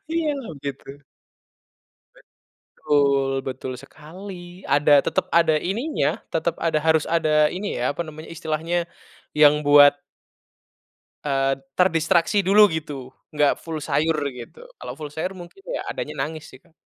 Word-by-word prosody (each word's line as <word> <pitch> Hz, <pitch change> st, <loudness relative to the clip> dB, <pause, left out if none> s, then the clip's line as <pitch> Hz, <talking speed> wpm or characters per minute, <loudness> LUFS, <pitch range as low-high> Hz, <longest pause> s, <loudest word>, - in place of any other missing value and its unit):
Iya 330 Hz, -2 st, 0 dB
loh 235 Hz, -, -8 dB
gitu. 140 Hz, -1 st, -6 dB, 1.7 s
Betul, 140 Hz, -2 st, +1 dB
betul 130 Hz, 0 st, -5 dB
sekali 175 Hz, +6 st, -11 dB
ada 145 Hz, 0 st, +5 dB
tetap, -, -, -1 dB
ada 165 Hz, -1 st, +4 dB
ininya 235 Hz, -, -1 dB, 0.2 s
tetap -, -, -1 dB
ada 165 Hz, -2 st, 0 dB
harus 160 Hz, -1 st, +2 dB
ada 155 Hz, -2 st, +2 dB
ini 200 Hz, +3 st, -4 dB
ya, 125 Hz, +4 st, 0 dB
apa -, -, -4 dB
namanya 155 Hz, -1 st, -9 dB
istilahnya 165 Hz, +2 st, -2 dB, 0.5 s
yang 150 Hz, 0 st, +6 dB
buat 145 Hz, 0 st, +6 dB, 1.2 s
eee, 135 Hz, -1 st, +1 dB, 0.2 s
terdistraksi 170 Hz, +2 st, +2 dB
dulu 205 Hz, +3 st, +6 dB
gitu 145 Hz, -5 st, -6 dB, 0.2 s
enggak 150 Hz, -1 st, +2 dB
full 160 Hz, -2 st, -6 dB
sayur 155 Hz, +2 st, +1 dB, 0.2 s
gitu 125 Hz, -, -11 dB, 0.2 s
kalau -, -, -7 dB
full 150 Hz, -1 st, -8 dB
sayur 170 Hz, +5 st, -3 dB
mungkin 175 Hz, -, -12 dB
ya -, -, -3 dB
adanya -, -, -5 dB
nangis 155 Hz, -1 st, -7 dB
sih 130 Hz, -, -14 dB
Kak. 170 Hz, -2 st, -28 dB
155 Hz, 135 wpm, -23 LUFS, 145-175 Hz, 1.7 s, yang